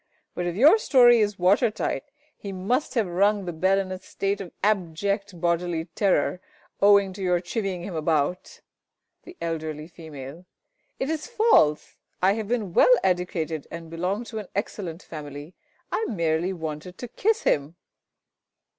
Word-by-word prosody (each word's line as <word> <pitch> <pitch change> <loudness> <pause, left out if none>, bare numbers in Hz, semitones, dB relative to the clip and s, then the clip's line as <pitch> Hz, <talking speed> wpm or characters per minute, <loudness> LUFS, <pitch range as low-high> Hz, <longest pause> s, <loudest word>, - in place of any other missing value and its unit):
But 175 - -3
if 175 - -3
your 300 - +6
story 245 - +6
is 205 -2 +1
watertight, 205 +9 +1 0.3
he 200 - -7
must 205 +12 -1
have 225 -3 +2
rung 200 +3 +1
the 175 - -4
bell 185 +4 +2
in 190 -1 -2
a 185 - -5
state 200 +1 -3
of 180 - -8
abject 200 0 -1
bodily 170 -1 0
terror, 190 -2 +1 0.4
owing 200 -1 +5
to 195 - -9
your 180 -2 +2
chivying 185 0 -3
him 185 - -6
about! 160 +1 -1 0.6
The 355 0 -12
Eld. 165 -2 -3
F. 155 +1 -6
It 155 +1 -9 0.7
is 310 -1 -3
false! 435 - +3 0.2
I 190 +2 +4
have 220 -1 -4
been 215 -6 -2
well 250 - +7
educated, 175 -4 -1
and 165 -1 -8
belong 180 +7 -2
to 225 -2 -6
an 210 - -8
excellent 185 -4 -4
family. 145 +1 -8 0.4
I 445 - 0
merely 170 - 0
wanted 160 0 -6
to 245 - -6
kiss 445 - 0
him. 145 +3 +1
185 Hz, 155 wpm, -25 LUFS, 165-205 Hz, 0.7 s, well